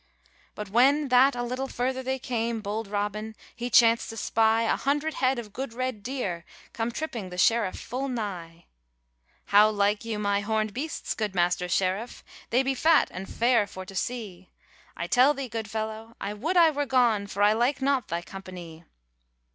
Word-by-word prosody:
But 210 -2 -7
when 275 +5 +4
that 255 +2 +5
a 245 - -2
little 255 +2 -3
further 260 +1 -2
they 265 +1 -2
came, 235 -2 -2
Bold 215 +1 -4
Robin 210 +2 -3 0.2
he 240 0 -4
chanced 230 0 +5
to 225 - -7
spy 225 +1 +2
A 230 - +2
hundred 295 +3 -1
head 260 -1 +1
of 215 -4 -7
good 265 0 -5
red 255 -3 -3
deer, 200 -8 -4 0.3
Come 230 +1 -2
tripping 235 -9 -5
the 180 - -8
sheriff 220 0 +2
full 265 +3 -4
nigh. 180 -9 -5 0.8
'How 210 +1 +6
like 205 0 +1
you 225 -2 -3
my 200 -1 0
hornd 215 0 -1
beasts, 300 +5 -4
good 210 -3 -3
Master 180 0 +1
Sheriff? 195 +6 -1 0.3
They 250 +3 +3
be 270 0 0
fat 320 +5 +4
and 190 +1 -7
fair 235 -3 +2
for 190 -2 -9
to 195 - -11
see: 190 -3 -5 0.3
' - - -29
'I 170 - -3
tell 255 +10 +4
thee, 275 -1 -4
good 225 -3 -5
fellow, 220 +1 -5
I 205 - -4
would 315 - -1
I 330 -2 +7
were 290 -1 -2
gone, 235 -6 +2
For 200 +1 -1
I 210 +1 +5
like 245 +5 +1
not 270 -3 +1
thy 170 +1 -3
company.' 175 -4 -10
225 Hz, 185 wpm, -27 LUFS, 200-255 Hz, 0.8 s, I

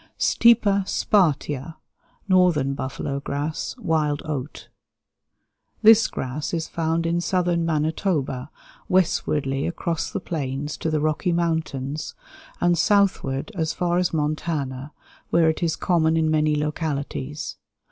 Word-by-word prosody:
Stipa 210 -4 +4
spartea 155 -5 +1 0.5
(Northern 175 -8 +3
buffalo 135 0 -4
grass; 145 +2 -3
wild 155 -8 0
oat). 150 -2 -5 1.2
This 225 0 +7
grass 135 +6 -4
is 165 -1 -2
found 165 0 -1
in 170 +1 +1
southern 175 -2 0
Manitoba, 155 -4 -1 0.4
westwardly 145 -6 +1
across 170 -3 -2
the - - -3
plains 145 -2 -4
to 160 - -2
the 155 -1 +1
Rocky 155 +4 0
Mountains, 160 -4 -2 0.4
and 175 -1 +2
southward 200 -7 +1
as 160 -5 -1
far 175 0 +1
as 180 - +1
Montana, 150 -3 -2 0.4
where 165 -1 +4
it 160 - -8
is 165 -2 +1
common 165 -2 +2
in 160 -1 +2
many 155 -1 +2
localities. 150 -1 -3
160 Hz, 115 wpm, -23 LUFS, 145-175 Hz, 1.2 s, This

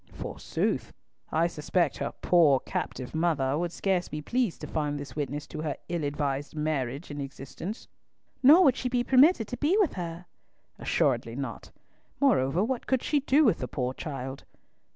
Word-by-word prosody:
"Forsooth! - - -3 0.4
I 160 +2 +3
suspect 170 -1 0
her - - -2
poor 155 -7 +5
captive 130 -2 -4
mother 155 -5 +1
would 170 +2 -1
scarce 185 -1 0
be 150 - -4
pleased 235 +5 -1
to - - -5
find 150 -2 -2
this 140 - -8
witness 145 0 -3
to 155 - -5
her 150 -3 -3
ill 170 -2 -2
advised 145 0 -2
marriage 150 -1 -2
in 145 0 -5
existence." 140 - -7 0.5
"Nor 300 +8 +8
would 265 -6 +5
she 250 - -2
be 245 -1 +1
permitted 260 - +5
to 245 - -4
be 325 +7 +2
with 400 -9 +3
her." 170 -1 -5 0.5
"Assuredly - - 0
not. - - -5 0.5
Moreover, 185 - +3
what 250 +2 -2
could 260 -2 +1
she 295 - +2
do 285 +2 +4
with 215 -9 +3
the 125 - -3
poor 125 -1 -2
child?" 135 -2 -6
165 Hz, 170 wpm, -28 LUFS, -, 0.5 s, Nor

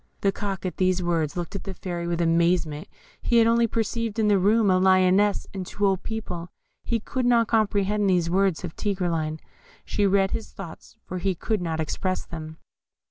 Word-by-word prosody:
The 195 - +3
Cock 195 -1 -4
at 185 - -4
these 185 -1 +1
words 165 -3 0
looked 175 +3 -4
at 195 - -4
the 195 -2 -6
Fairy 175 -2 -4
with 170 0 -1
amazement; 165 -2 +1 0.3
he 235 - +2
had 230 - +6
only 230 0 +3
perceived 230 0 -2
in 215 -1 +2
the 200 -2 +4
room 210 +1 +3
a 185 - +4
lioness 190 +2 +3
and 190 -2 -4
two 205 +3 -2
old 190 -2 +2
people; 180 -6 -5 0.3
he 230 - -1
could 250 +3 -2
not 235 -2 +4
comprehend 210 -2 +1
these 175 -2 +2
words 190 -1 +1
of 170 -3 -6
Tigreline; 170 -6 -1 0.5
she 205 -1 +1
read 195 0 +2
his 225 - -4
thoughts, 195 +3 -10
for 185 - -5
he 190 0 0
could 215 +4 -2
not 165 -2 -2
express 185 +4 -2
them. 160 -1 -8
190 Hz, 190 wpm, -25 LUFS, 175-210 Hz, 0.5 s, had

